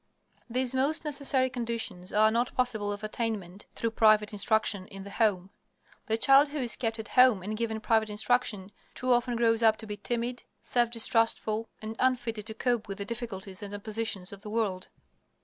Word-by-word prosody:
These 255 +1 0
most 280 +5 0
necessary 275 -3 +1
conditions 230 -7 -4
are 215 +1 +4
not 240 +2 0
possible 220 -5 0
of 205 +1 -6
attainment 215 -4 -4
through 230 - -1
private 215 -2 +4
instruction 205 -2 +1
in 195 0 -9
the 200 - -9
home. 195 -4 +1 0.6
The 220 - +1
child 275 +5 +6
who 300 - -5
is 245 -4 +1
kept 225 -2 -2
at 220 -1 -7
home 250 -7 +5
and 215 +3 -3
given 220 0 -2
private 220 -1 +1
instruction 210 -2 0 0.2
too 255 0 -1
often 245 0 +1
grows 230 -1 +2
up 220 -1 +5
to 220 - -7
be 210 -1 -6
timid, 240 +3 -3 0.2
self 240 -1 +1
distrustful, 225 -1 +1
and 220 +1 -5
unfitted 240 -4 0
to 220 - -6
cope 240 -3 0
with 195 -1 -5
the 200 - -4
difficulties 205 -4 -5
and 205 0 -6
oppositions 205 -2 -2
of 200 - -11
the 210 - -8
world. 210 -4 -2
225 Hz, 185 wpm, -29 LUFS, 210-240 Hz, 0.6 s, child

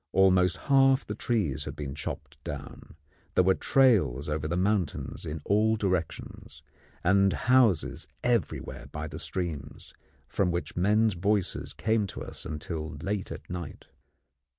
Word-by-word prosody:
Almost 95 -1 +4
half 135 +1 +4
the 105 - -4
trees 105 - -1
had - - -6
been 70 -2 -5
chopped 70 - -7
down; - - -8 0.4
there 90 - +5
were 95 +1 +5
trails 100 - +3
over 75 0 -1
the 85 +3 -1
mountains 95 -2 -1
in 75 0 -4
all 110 +2 +3
directions, 95 -6 -3 0.4
and 95 +1 +4
houses 125 - +2 0.2
everywhere 120 - -1
by 75 +1 -4
the - - -7
streams, 80 -6 -5 0.3
from 95 -3 +1
which 85 0 -3
men's 105 +4 +3
voices 100 +2 0
came 110 -2 +1
to - - -7
us - - -6
until 80 +1 -5
late 100 0 -2
at - - -8
night. 90 -4 -7
95 Hz, 140 wpm, -28 LUFS, 80-105 Hz, 0.4 s, there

